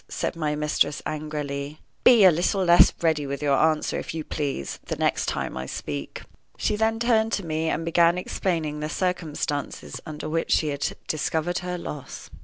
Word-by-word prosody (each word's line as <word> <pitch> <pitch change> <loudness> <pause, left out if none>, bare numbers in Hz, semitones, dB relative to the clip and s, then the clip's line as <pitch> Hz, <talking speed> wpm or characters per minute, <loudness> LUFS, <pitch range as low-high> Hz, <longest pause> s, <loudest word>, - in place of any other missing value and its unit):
said - - -2
my 155 -2 -1
mistress, 150 -1 +1
angrily. 150 -1 -4 0.2
"Be 235 -4 +7
a 185 - +9
little 180 +4 +1
less 175 0 +7
ready 155 -3 +2
with 140 +2 -4
your 140 -1 +3
answer, 155 +1 +2
if - - -6
you 160 - -3
please, 140 - -3
the - - -3
next - - 0
time - - -2
I 65 0 -4
speak." 70 0 -5 0.3
She 210 - 0
then 220 +1 +1
turned 225 -1 +2
to 200 - -1
me, 160 0 -1
and 165 +1 -1
began 170 +1 +4
explaining 165 -5 -2
the 150 0 -3
circumstances 155 -5 -3
under 155 -1 -6
which 165 +1 0
she 155 - +2
had 140 0 -2
discovered 160 +3 -1
her 180 0 -4
loss. 150 -5 -8
155 Hz, 180 wpm, -25 LUFS, 150-175 Hz, 0.3 s, a